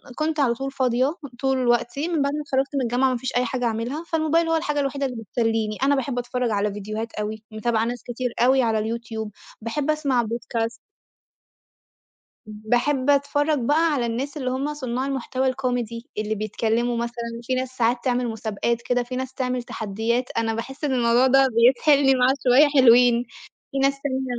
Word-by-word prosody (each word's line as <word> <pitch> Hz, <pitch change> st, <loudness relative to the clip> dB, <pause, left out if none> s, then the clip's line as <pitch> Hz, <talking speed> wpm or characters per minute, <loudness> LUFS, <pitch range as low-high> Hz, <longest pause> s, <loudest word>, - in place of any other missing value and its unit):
كنت 310 Hz, +1 st, -1 dB
على 255 Hz, -4 st, +3 dB
طول 270 Hz, +3 st, -5 dB
فاضية 260 Hz, +2 st, +1 dB, 0.2 s
طول 265 Hz, -1 st, +1 dB
الوقت 240 Hz, +1 st, +1 dB
من 325 Hz, 0 st, 0 dB
بعد 280 Hz, 0 st, 0 dB
ما 300 Hz, -, -2 dB
اتخرّجت 275 Hz, -1 st, -1 dB
من 275 Hz, -, +1 dB
الجامعة 250 Hz, +2 st, +2 dB
ما 255 Hz, -, -1 dB
فيش 260 Hz, +2 st, -5 dB
أي 250 Hz, -, +2 dB
حاجة 250 Hz, +1 st, -2 dB
أعملها، 235 Hz, +7 st, -2 dB
فالموبايل 325 Hz, +1 st, +1 dB
هو 325 Hz, -, +2 dB
الحاجة 295 Hz, -2 st, -1 dB
الوحيدة 275 Hz, 0 st, -1 dB
اللي 245 Hz, -4 st, -5 dB
بتسلّيني، 225 Hz, 0 st, -1 dB
أنا 280 Hz, +1 st, +4 dB
باحب 270 Hz, -2 st, -2 dB
أتفرّج 245 Hz, 0 st, -2 dB
على 205 Hz, 0 st, 0 dB
فيديوهات 215 Hz, +3 st, -5 dB
أوي 215 Hz, +1 st, -4 dB
متابعة 220 Hz, +1 st, 0 dB
ناس 245 Hz, 0 st, -4 dB
كتير 245 Hz, 0 st, -4 dB
أوي 260 Hz, +2 st, +4 dB
على 225 Hz, -3 st, +1 dB
الYouTube، 225 Hz, -2 st, -5 dB, 0.3 s
باحب 275 Hz, +7 st, -1 dB
أسمع 280 Hz, -6 st, +1 dB
podcast. 230 Hz, 0 st, -3 dB, 1.7 s
باحب 245 Hz, +6 st, 0 dB
أتفرّج 290 Hz, +1 st, +2 dB
بقى 305 Hz, +6 st, +2 dB
على 250 Hz, -4 st, 0 dB
الناس 260 Hz, +6 st, -3 dB
اللي 255 Hz, -3 st, -2 dB
هُم 275 Hz, +3 st, -2 dB
صنّاع 255 Hz, -3 st, -3 dB
المحتوى 265 Hz, -1 st, -1 dB
الcomedy 245 Hz, -3 st, -2 dB, 0.2 s
اللي 215 Hz, 0 st, -1 dB
بيتكلموا 225 Hz, +3 st, -1 dB
مثلًا 235 Hz, 0 st, -4 dB
في 255 Hz, -, -2 dB
ناس 255 Hz, 0 st, -2 dB
ساعات 240 Hz, +1 st, +2 dB
تعمل 250 Hz, -1 st, 0 dB
مسابقات 225 Hz, +1 st, -2 dB
كده، 245 Hz, 0 st, 0 dB
في 250 Hz, +1 st, -6 dB
ناس 260 Hz, 0 st, -4 dB
تعمل 255 Hz, -2 st, -2 dB
تحدّيات 225 Hz, +3 st, -2 dB
أنا 225 Hz, 0 st, +1 dB
باحس 265 Hz, +6 st, -6 dB
إن 285 Hz, -3 st, +1 dB
الموضوع 240 Hz, +1 st, +3 dB
ده 270 Hz, +1 st, +5 dB
بيسحلني 270 Hz, +3 st, +5 dB
معاه 255 Hz, +1 st, +3 dB
شوية 260 Hz, +4 st, +6 dB
حلوين، 240 Hz, 0 st, +6 dB, 0.5 s
في -, -, -3 dB
ناس 275 Hz, 0 st, +1 dB
تانية 265 Hz, -2 st, -2 dB
250 Hz, 180 wpm, -23 LUFS, 230-270 Hz, 1.7 s, شوية